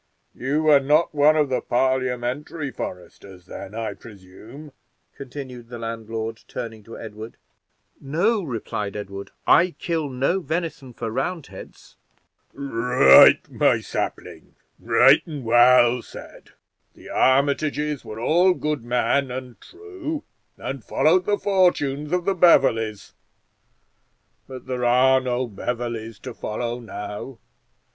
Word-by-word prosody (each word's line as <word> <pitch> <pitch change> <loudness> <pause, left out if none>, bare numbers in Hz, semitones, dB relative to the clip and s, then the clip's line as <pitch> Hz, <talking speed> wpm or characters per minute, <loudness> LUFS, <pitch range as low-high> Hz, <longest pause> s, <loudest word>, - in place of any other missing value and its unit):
You 150 +5 -1
are 145 -2 +7
not 150 +5 +2
one 150 +1 +4
of 150 -3 +2
the 130 - -1
Parliamentary 130 +3 -1
foresters, 90 -1 -9
then, 100 +2 -9
I 115 -1 -3
presume?" 110 +8 -13 0.4
continued 130 -3 -9
the 120 - -7
landlord, 115 -1 -5
turning 115 -3 -7
to 115 - -10
Edward. 110 0 -9 0.6
"No," 180 +11 0
replied 110 - -5
Edward, 100 -1 -7 0.2
"I 175 0 +4
kill 160 -4 -2
no 135 +8 0
venison 160 -5 -4
for 115 -1 -5
Roundheads." 155 +7 -6 0.5
"Right, 125 - +5
my - - +2
sapling; - - -6 0.2
right 135 +4 +5
and 150 -5 -7
well 120 +1 +5
said. - - -13 0.5
The - - -14
Armitages 145 +2 +1
were 110 - -8
all 175 +9 +3
good 150 -5 -3
men 125 +3 0
and 125 -1 -8
true, 360 -6 -7 0.3
and - - -6
followed 370 - +2
the 205 - +1
fortunes 150 -8 +1
of 180 -1 0
the 195 - +2
Beverleys; 115 - +3 1.3
but 130 -1 -10
there 125 -1 -4
are 130 +2 +4
no 125 0 -1
Beverleys 115 0 -5
to 125 - -6
follow 120 +3 -4
now. 115 +2 -7
130 Hz, 120 wpm, -23 LUFS, 115-150 Hz, 1.3 s, are